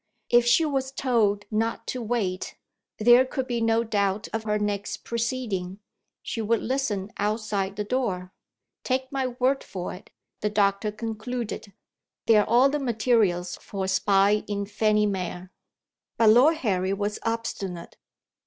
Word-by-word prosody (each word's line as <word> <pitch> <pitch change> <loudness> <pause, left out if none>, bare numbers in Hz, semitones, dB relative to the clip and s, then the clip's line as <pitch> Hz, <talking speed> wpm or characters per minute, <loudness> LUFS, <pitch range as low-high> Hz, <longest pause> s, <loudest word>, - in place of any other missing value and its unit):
If 240 0 +5
she 240 +7 +5
was 270 -3 -1
told 225 -7 +1
not 225 +2 -1
to 255 - -3
wait, 210 -5 -2 0.4
there 240 +3 +6
could 260 0 -3
be 240 -2 -2
no 225 0 +2
doubt 205 -1 0
of 220 0 -3
her 210 -1 +1
next 205 -1 -3
proceeding: 230 -6 -3 0.5
she 225 - -3
would 225 +1 +1
listen 220 -7 -2
outside 205 -2 -1
the 210 - -2
door. 200 -6 -2 0.5
"Take 260 0 -1
my 270 -2 -1
word 255 +2 0
for 180 -2 -6
it," 180 - -12 0.3
the 210 - 0
doctor 205 0 +1
concluded, 225 -1 -5 0.5
"there 220 -2 +6
are - - -3
all 245 +4 +6
the 295 +2 -1
materials 215 -8 +1
for 195 -2 -5
a - - -3
spy 200 +2 +3
in 200 -1 -2
Fanny 210 +1 +2
Mere." 185 -2 -4 0.7
But 225 -2 +6
Lord 265 +8 +6
Harry 190 - 0
was 205 +1 -2
obstinate. 200 -6 -4
215 Hz, 150 wpm, -26 LUFS, 200-240 Hz, 0.7 s, there